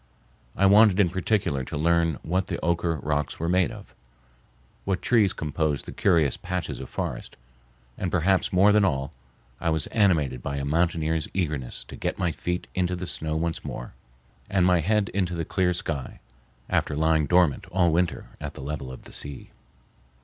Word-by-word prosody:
I 100 - +2
wanted 105 0 +6
in 95 -4 +4
particular 95 -7 0
to - - -5
learn 85 0 +2
what 90 +3 0
the - - -2
Oquirrh 85 -1 0
rocks 75 -1 -1
were 85 - -1
made 90 0 +2
of, - - -11 0.9
what 95 -2 -1
trees 110 -6 +3
composed 75 -1 -2
the - - -7
curious 80 -8 +2
patches 85 -7 -4
of 65 - -8
forest; - - -5 0.6
and, 90 - -1
perhaps 95 +2 +2
more 95 +3 +5
than 105 0 +4
all, 70 -7 0 0.5
I 85 - 0
was 80 -2 +2
animated 80 - +2
by 70 +2 -3
a 70 - -2
mountaineer's 80 0 0
eagerness 75 -9 -2
to - - -11
get - - -3
my 90 -2 0
feet 90 +3 -3
into 90 -1 0
the 90 +1 -5
snow 80 -2 -2
once 80 +1 -2
more, - - -6 0.6
and 95 -3 +3
my 90 -1 +4
head 100 +4 +1
into 90 -2 -1
the 85 -1 -2
clear 90 +1 +1
sky, 80 -6 -3 0.5
after 75 - 0
lying 80 -1 +2
dormant 90 -5 +3
all 90 -2 +2
winter 85 +2 0 0.2
at - - -6
the - - -8
level 70 -2 -5
of 65 - -10
the - - -14
sea. 70 -2 -7
85 Hz, 180 wpm, -26 LUFS, 75-90 Hz, 0.9 s, wanted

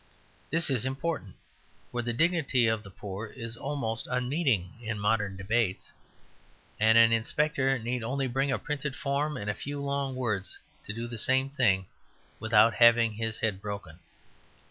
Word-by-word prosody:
This 165 -2 +1
is 125 -5 +2
important; 135 - -3 0.6
for 120 - -2
the 120 0 -2
dignity 140 -3 +2
of 110 -1 +1
the 100 - -12
poor 100 +2 -7
is 115 0 -6
almost 120 -4 -3
unmeaning 125 - 0
in 110 -2 -3
modern 105 -2 0
debates; 100 0 -1 0.9
and 110 +1 +5
an 115 0 +7
inspector 135 +4 +1
need 120 +1 -3
only 135 +4 -1
bring 135 +2 0
a 130 - +1
printed 145 -2 -4
form 145 +2 -1
and 100 - -6
a 105 - 0
few 145 +5 -5
long 140 -1 -2
words 105 -7 -2 0.3
to - - -2
do 115 +2 -4
the 120 -1 -6
same 130 +4 +3
thing 100 -9 +2 0.5
without 110 0 +4
having 115 -1 +5
his 110 +1 -2
head 105 -4 -1
broken. 100 -6 -7
120 Hz, 160 wpm, -29 LUFS, 110-135 Hz, 0.9 s, an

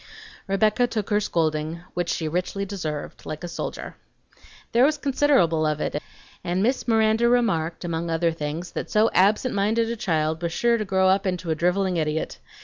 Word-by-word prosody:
Rebecca 215 +5 +2
took 220 -3 -4
her 205 - +4
scolding 160 -3 -1
(which 175 -1 -2
she 160 - -1
richly 185 +4 -2
deserved) 160 -7 -5
like 155 +2 -6
a - - -3
soldier. 170 - -6 0.7
There 235 +2 +4
was 300 +2 +3
considerable 270 - +2
of 150 0 -1
it, 150 - -2 0.4
and 180 +2 0
Miss 255 +4 0
Miranda 225 +1 +3
remarked, 180 -10 +1
among 170 0 -2
other 165 +1 +1
things, 160 +2 -5
that - - -5
so 215 +1 +3
absent 210 +7 +3
minded 220 +3 +1
a - - -2
child 160 -7 -1
was 170 -1 -2
sure 235 +2 +2
to 215 - -2
grow 190 -1 +2
up 190 +1 +2
into 180 -2 -2
a - - +1
driveling 180 +2 +1
idiot. 155 0 -2
185 Hz, 180 wpm, -24 LUFS, 165-220 Hz, 0.7 s, her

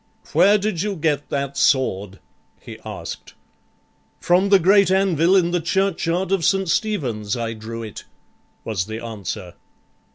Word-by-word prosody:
"Where 205 +1 +5
did 205 -4 -2
you 205 0 -2
get 150 -3 -1
that 140 -1 -3
sword?" 100 -9 +1 0.4
he - - -11
asked. - - -8 0.8
"From 185 +3 +2
the 200 - +7
great 195 +1 +4
anvil 190 -2 +3
in 175 -2 +3
the 175 -1 0
churchyard 185 0 0
of 195 -3 +1
St. 195 +3 +2
Stephen's 130 - -1
I 115 -1 -3
drew 115 +1 -7
it," 110 -2 -9 0.6
was 100 -6 -2
the 110 0 -5
answer. 105 -5 -6
165 Hz, 140 wpm, -21 LUFS, 115-190 Hz, 0.8 s, the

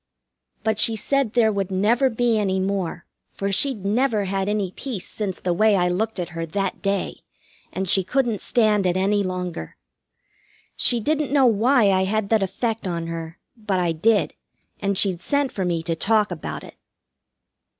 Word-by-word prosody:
But 220 -1 0
she 225 +1 +4
said 265 +1 0
there 225 -3 +3
would 200 -2 -2
never 220 +8 +2
be 230 -1 +1
any 190 -2 0
more, 190 -3 -2 0.2
for 200 0 -3
she'd 215 -1 +1
never 220 0 +1
had 195 +1 -2
any 205 -3 -1
peace 230 -4 -5
since 200 -4 -4
the 180 - -1
way 215 +3 +3
I 180 -2 +2
looked 215 +3 -2
at 175 - -3
her 165 -1 -5
that 195 +4 -3
day, 200 -1 -1 0.5
and 190 +1 -3
she 190 +2 +3
couldn't 235 +1 0
stand 210 -5 +2
it 180 +1 +1
any 200 +2 +2
longer. 180 - -5 1.0
She 240 - +4
didn't 300 +3 -1
know 280 -2 +4
why 230 -1 +4
I 190 0 +2
had 210 +1 -1
that 220 -2 +3
effect 220 +2 -2
on 170 -2 -3
her, 165 0 -6 0.2
but 210 -5 -2
I 175 -2 +1
did, 205 +7 +1 0.5
and 200 -1 -1
she'd 185 -3 +1
sent 285 -2 0
for 190 - -3
me 170 -2 -1
to 165 0 -1
talk 210 +4 +2
about - - -5
it. - - -13
200 Hz, 180 wpm, -23 LUFS, 185-225 Hz, 1.0 s, she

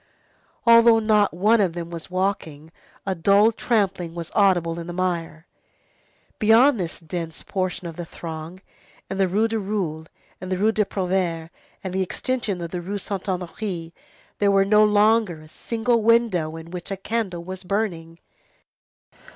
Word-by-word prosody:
Although 230 0 +7
not 215 -2 +3
one 210 +6 +3
of 185 -4 +1
them 170 0 -6
was 165 -2 -8
walking, 175 -5 -3 0.3
a 195 - 0
dull 200 +5 +4
trampling 195 -7 -1
was 170 -1 -6
audible 175 -5 +2
in 170 - -7
the 175 - -5
mire. 170 -3 -3 0.9
Beyond 230 +4 +5
this 170 -3 -4
dense 165 -1 -6
portion 185 -2 -3
of 165 - -9
the 175 - -5
throng, 160 +1 -7 0.5
in 195 - -3
the 190 - +3
Rue 210 +5 +2
du 225 0 -2
Roule, 185 -6 -3 0.3
in 185 - -6
the 185 - -1
Rue 215 +4 +3
des 215 -1 +1
Prouvaires, 180 -4 -2 0.3
and 185 -2 -4
in 190 - -1
the - - +2
extension 210 -2 -3
of 170 -1 -5
the 180 - -3
Rue 200 +4 -4
Saint 195 -1 -5
Honoré, 180 -2 -4 0.5
there 205 - +3
was 195 0 +4
no 210 +1 +5
longer 210 -4 +3
a 155 - -14
single 230 +7 -1
window 215 -9 +2
in 165 +1 -10
which 180 -1 -6
a 195 - -3
candle 195 -4 -3
was 185 +1 -7
burning. 180 -4 -3
185 Hz, 165 wpm, -23 LUFS, 170-210 Hz, 0.9 s, Although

